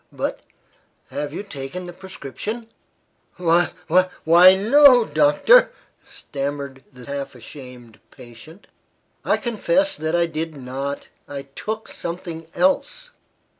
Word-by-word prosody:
But, - - -3 0.7
have 145 -1 -4
you 170 - -5
taken 165 -1 -7
the 175 - -8
prescription." 190 - -7 0.7
"Wh 175 -1 +3 0.2
wh 180 +3 +4 0.2
why 175 +3 +8
no, 245 +4 +6
doctor," 155 - +5 0.4
stammered 140 -1 -6
the 125 -2 -13
half 140 -1 -5
ashamed 125 -2 -12
patient. 130 - -14 0.6
"I - - +2
confess 255 +4 0
that 160 +2 -2
I 170 0 +3
did 160 -1 -5
not. 135 +2 -5 0.2
I 140 -1 -6
took 215 +11 -6
something 170 -2 -6
else." 190 - 0
160 Hz, 115 wpm, -22 LUFS, 140-190 Hz, 0.7 s, why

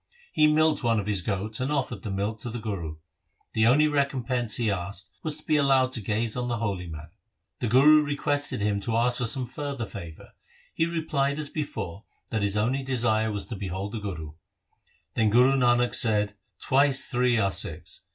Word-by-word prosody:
He 155 -1 +5
milked 155 -1 +3
one 115 -2 +2
of 100 - -4
his 100 -3 +2
goats, 105 +3 -1
and 130 +3 -1
offered 130 -8 -2
the 105 - -6
milk 100 +3 -2
to 120 - -4
the 120 - -5
Guru. 100 -9 -5 0.6
The 110 0 +3
only 150 +5 +5
recompense 130 -5 0
he 115 -3 +1
asked 95 0 -4
was 155 -2 -3
to 155 - -14
be 155 - +2
allowed 135 -2 +3
to 120 - -3
gaze 110 +2 -1
on 125 -1 -2
the 120 -1 -1
holy 100 -5 -3
man. 80 -1 -9 0.5
The 120 - -1
Guru 145 +7 +6
requested 145 -3 -1
him 105 -1 0
to 110 +3 -2
ask 120 +1 +1
for 125 - 0
some 130 +2 +2
further 140 -1 -5
favour. 85 -7 -10 0.4
He 165 - +1
replied 155 -4 -1
as 150 -2 -3
before, 110 - -5 0.3
that 110 - -1
his 100 0 0
only 125 +6 0
desire 120 -4 +1
was 105 -1 -4
to 115 - -6
behold 95 +1 -5
the 115 - -4
Guru. 80 -7 -6 0.8
Then 110 -1 +2
Guru 125 +5 +5
Nanak 125 -2 +2
said, 105 -2 +3 0.2
"Twice 140 0 +3
three 125 -2 +1
are 100 -3 +1
six. - - 0
120 Hz, 195 wpm, -26 LUFS, 105-135 Hz, 0.8 s, Guru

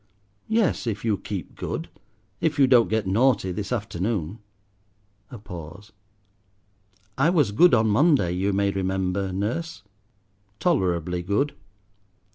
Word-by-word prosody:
"Yes, 220 - +1
if 110 0 -3
you 110 -2 +2
keep 100 -3 -7
good. - - -4 0.5
If 160 -2 0
you 140 - +6
don't 125 -3 +4
get 110 -2 0
naughty 110 0 +2
this 100 +4 -5
afternoon." 105 -4 -2 0.9
A 125 - -9
pause. 90 0 -10 1.3
"I 145 +5 +4
was 150 - +2
good 170 +8 +5
on 110 -1 +2
Monday, 130 - +3
you 95 +3 0
may 100 0 +1
remember, 95 0 -1
nurse." 115 - -3 0.8
"Tolerably 90 - 0
good." 105 +11 0
105 Hz, 120 wpm, -24 LUFS, 95-130 Hz, 1.3 s, you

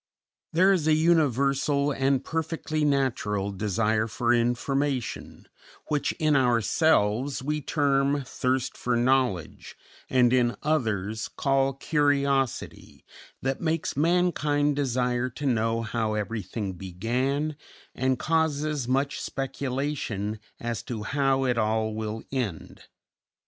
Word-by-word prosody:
_" - - -69 0.5
There 185 +4 +5
is 165 -5 0
a 155 - +5
universal, 140 -3 +2
and 135 -1 +1
perfectly 160 -1 -2
natural, 115 -8 0
desire 110 +2 0
for 120 +2 +1
information, 125 +2 -1 0.4
which 145 -2 +1
in 155 -3 +1
ourselves 125 - +2
we 150 +2 -1
term 140 -1 +1
thirst 130 0 -1
for 125 -1 -1
knowledge 120 - 0 0.3
and 125 -1 +4
in 120 -2 +2
others 110 -8 -1
call 135 -1 +1
curiosity, 140 -3 0 0.4
that 135 0 -1
makes 165 -1 -1
mankind 150 -3 +2
desire 125 -2 0
to 145 +4 -7
know 115 -2 +1
how 110 -2 -1
everything 105 -1 -3
began 125 - -2 0.4
and 130 0 0
causes 155 -4 0
much 135 +2 0
speculation 130 -6 -3 0.2
as 120 -1 -3
to 110 -4 -5
how 135 +2 +1
it 125 -3 +1
all 110 0 0
will 110 0 -4
end. 120 - -4
130 Hz, 110 wpm, -26 LUFS, 115-145 Hz, 0.5 s, There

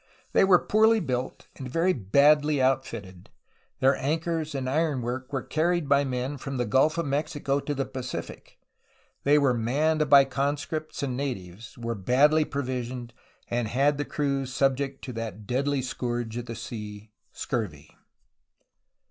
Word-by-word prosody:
''They 195 - +5
were 185 -2 +7
poorly 220 +3 +3
built 130 -7 -3
and 130 -2 -6
very 165 +7 +2
badly 145 - +3
outfitted. 115 -9 -1 0.5
Their 135 +1 +5
anchors 160 +2 -2
and 130 -1 -2
ironwork 130 -3 -1
were 135 -2 -2
carried 170 0 0
by 140 0 +4
men 130 +2 -3
from 135 0 -5
the 120 - 0
Gulf 135 +9 +3
of 170 - 0
Mexico 145 0 -1
to 145 +1 -3
the 135 0 -1
Pacific; 130 -1 -7 0.7
they 145 +1 +5
were 140 -3 +3
manned 150 +6 +1
by 140 -1 +8
conscripts 145 +3 -3
and 130 -3 -2
natives; 115 -6 -5
were 115 -1 -3
badly 140 +9 +3
provisioned, 125 -3 -4 0.3
and 120 -2 -1 0.3
the 145 - -2
crews 140 -3 -2
subject 135 +1 0
to 125 - -6
that 110 -2 -6
deadly 135 +3 0
scourge 120 -2 -3
of 120 0 -5
the 115 - -5
sea, 105 -1 -8 0.2
scurvy." 100 - -4
135 Hz, 145 wpm, -27 LUFS, 120-145 Hz, 0.7 s, by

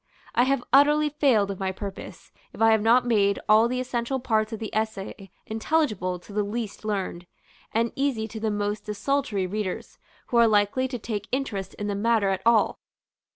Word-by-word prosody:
I 245 - +4
have 270 -2 +1
utterly 295 +2 +5
failed 260 -9 +2
of 195 - -7
my 190 -1 -1
purpose, 195 0 -8 0.2
if - - -12
I 225 0 +5
have 220 -1 +3
not 235 +3 +4
made 200 -4 +2
all 215 +2 +6
the 250 +1 -2
essential 255 +1 -2
parts 220 -3 0
of 225 - -4
the 220 0 -6
essay 205 -3 -3 0.2
intelligible 220 - 0
to 200 - -13
the 210 - +1
least 210 +1 -4
learned, 190 -4 -3 0.4
and 230 +1 +1
easy 265 -6 -1
to 220 - -7
the 220 0 -1
most 205 0 -2
desultory 210 -1 -1
readers, 200 0 -4 0.3
who 240 - +1
are 235 -1 +6
likely 210 +4 +2
to 255 -1 -4
take 210 -3 -5
interest 215 -8 -3
in 205 - -5
the 205 - -1
matter 215 0 +2
at 190 -1 -1
all. 230 -2 +3
220 Hz, 190 wpm, -25 LUFS, 205-245 Hz, 0.4 s, all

